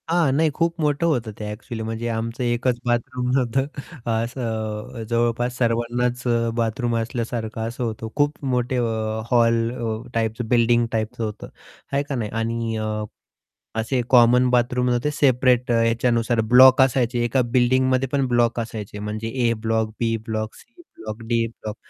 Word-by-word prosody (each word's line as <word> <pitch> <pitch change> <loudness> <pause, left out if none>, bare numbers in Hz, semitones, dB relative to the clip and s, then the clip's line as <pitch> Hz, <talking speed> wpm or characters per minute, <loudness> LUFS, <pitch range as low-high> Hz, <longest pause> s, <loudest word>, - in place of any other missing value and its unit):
हां. 165 -4 +3
नाही 160 +2 +3
खूप 165 0 0
मोठं 150 +1 +1
होतं 120 -8 0
ते 105 - -4
ॲक्चुअली 110 +1 -6
म्हणजे 115 +1 -4
आमचं 115 +2 -3
एकच 120 0 0
बाथरूम 125 +1 -1
नव्हतं 130 +1 +1 0.4
असं 115 0 -3
अ, - - -4
जवळपास 120 +1 0
सर्वांनाच 120 +1 0
अ, 115 -1 +1
बाथरूम 115 +1 -1
असल्यासारखं 115 -1 -3
असं 120 +2 -5
होतं 110 -1 -4
खूप 145 0 0
मोठे 125 +1 0
अ, 110 -2 -1
हॉल 115 -1 +3
अ, 115 -3 -3
टाईपचं 115 +1 -1
बिल्डिंग 120 0 +3
टाईपचं 110 +1 -2
होतं 105 -1 -5 0.4
आहे 140 +1 +1
का 145 -1 -4
नाही. 110 -4 -3
आणि 115 0 -2
अ, 110 0 -2 0.8
असे 125 +3 0
कॉमन 125 0 +5
बाथरूम 125 0 +2
नव्हते, 120 +4 0
सेपरेट 125 -3 +2
अ, 115 -1 +3
याच्यानुसार 115 0 +1
ब्लॉक 130 +1 +8
असायचे 125 -2 +2
एका 120 +2 +2
बिल्डिंगमध्ये 130 +1 +3
पण 140 -2 +1
ब्लॉक 120 -1 +2
असायचे 110 -3 -6
म्हणजे 105 +2 -4 0.2
ए - - +3
ब्लॉक, 110 -1 +1
बी 115 -1 +1
block, 110 0 -3
C 235 +9 -18 0.2
block, 110 +1 -7
D 115 -1 +1
block 110 -1 -8
120 Hz, 160 wpm, -22 LUFS, 115-125 Hz, 0.8 s, ब्लॉक